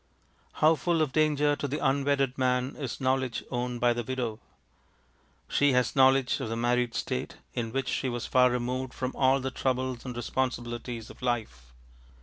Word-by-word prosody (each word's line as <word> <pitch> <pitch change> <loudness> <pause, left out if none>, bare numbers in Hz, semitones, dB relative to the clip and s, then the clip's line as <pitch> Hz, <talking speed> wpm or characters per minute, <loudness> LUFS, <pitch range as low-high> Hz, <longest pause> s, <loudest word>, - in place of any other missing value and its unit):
How 155 +1 +5
full 170 +1 0
of 145 - -2
danger 150 -1 +2
to 145 - -3
the 145 +2 -2
unwedded 135 -2 +1
men 130 0 0
is 135 -6 -5
knowledge 130 -2 0
owned 125 -1 -2
by 120 0 +3
the 120 0 -3
widow! 120 -3 -3 1.1
She 145 -1 +3
has 125 0 +1
knowledge 135 0 +4
of 130 -5 -3
the 115 - -2
married 120 0 +1
state, 65 - -3 0.2
in 115 -2 -3
which 135 +1 -2
she 130 +1 -1
was 120 -1 -3
far 125 -1 +4
removed 125 +1 -2
from 130 0 -2
all 130 0 +3
the 135 0 -3
troubles 130 -2 -1
and 125 -2 -6
responsibilities 120 -2 -3
of - - -16
life. 110 - -3
130 Hz, 170 wpm, -28 LUFS, 120-135 Hz, 1.1 s, How